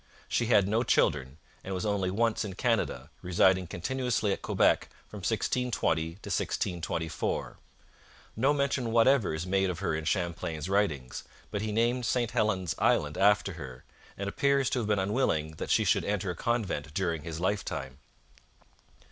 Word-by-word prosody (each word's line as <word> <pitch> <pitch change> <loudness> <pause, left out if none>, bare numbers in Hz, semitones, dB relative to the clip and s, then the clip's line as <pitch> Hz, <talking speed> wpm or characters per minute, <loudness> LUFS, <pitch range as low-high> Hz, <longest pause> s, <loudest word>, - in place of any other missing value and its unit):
She 120 - 0
had 105 -5 +4
no 110 +3 +2
children, 75 - +1 0.3
and 95 0 -4
was 95 - -3
only 100 -3 0
once 115 +4 +1
in 100 -3 -6
Canada, 95 - -1
residing 90 0 +3
continuously 115 +2 -1
at - - -6
Quebec - - +2 0.2
from 105 - -10
1620 110 -3 0
to 80 - -3
1624. 85 -5 -2 0.8
No 130 +6 +3
mention 140 -4 0
whatever 115 0 +4
is 80 +2 -4
made 95 0 +1
of 90 - -3
her 95 -2 -1
in 80 0 -3
Champlain's 85 -4 -2
writings, 80 -11 0 0.3
but 105 - -2
he 110 0 -2
named 120 +2 +1
St 120 -1 0
Helen's 95 -5 0
Island 75 0 +2
after 100 -1 +3
her, 65 -6 -9 0.3
and 100 - -3
appears 140 +5 +1
to 125 - +1
have 110 - -2
been 105 -1 +2
unwilling 95 - 0
that - - -5
she - - +4
should - - +2
enter 100 -2 -1
a - - -6
convent 95 -10 -2
during 85 -5 0
his 80 +1 -6
lifetime. 75 -8 -2
95 Hz, 160 wpm, -29 LUFS, 85-115 Hz, 0.8 s, had